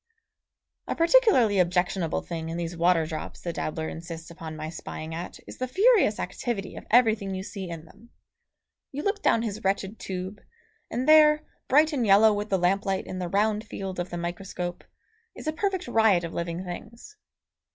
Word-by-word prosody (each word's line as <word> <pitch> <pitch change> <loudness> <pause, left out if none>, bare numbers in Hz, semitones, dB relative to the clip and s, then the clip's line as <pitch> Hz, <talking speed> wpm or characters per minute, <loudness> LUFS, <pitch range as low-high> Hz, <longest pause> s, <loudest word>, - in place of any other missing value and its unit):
A - - -2
particularly 330 - +4
objectionable 180 -1 +1
thing 165 -1 -5
in 165 - -4
these 170 0 -4
water 170 -1 +3
drops, 155 0 -6
the 170 - -4
dabbler 160 0 -3
insists 165 0 -8
upon 160 -1 -8
my 155 0 -5
spying 160 0 -7
at 170 +2 -6
is - - -11
the 255 - -1
furious 390 - +4
activity 195 +1 -4
of - - -10
everything 220 -5 +3
you 190 - -4
see 190 -2 -6
in 165 -1 -7
them. 235 +8 -19 0.8
You 290 +2 -5
look 405 0 -1
down 230 - +3
his 215 -2 -4
wretched 195 +2 -1
tube, 190 +2 -5 0.5
and 250 +4 -2
there, 305 0 +7 0.2
bright 305 +3 +4
and 260 -4 0
yellow 210 +1 +6
with 205 +1 -3
the 195 - +2
lamplight 190 +2 +1
in 185 - -6
the 180 -1 -3
round 210 +3 +1
field 195 -4 -6
of 175 - -3
the 175 - -5
microscope, 175 0 -5 0.5
is - - -9
a 310 - -1
perfect 375 0 -1
riot 220 -7 +4
of 170 - -5
living 170 +2 -3
things. 230 - -9
195 Hz, 180 wpm, -26 LUFS, 175-235 Hz, 0.8 s, there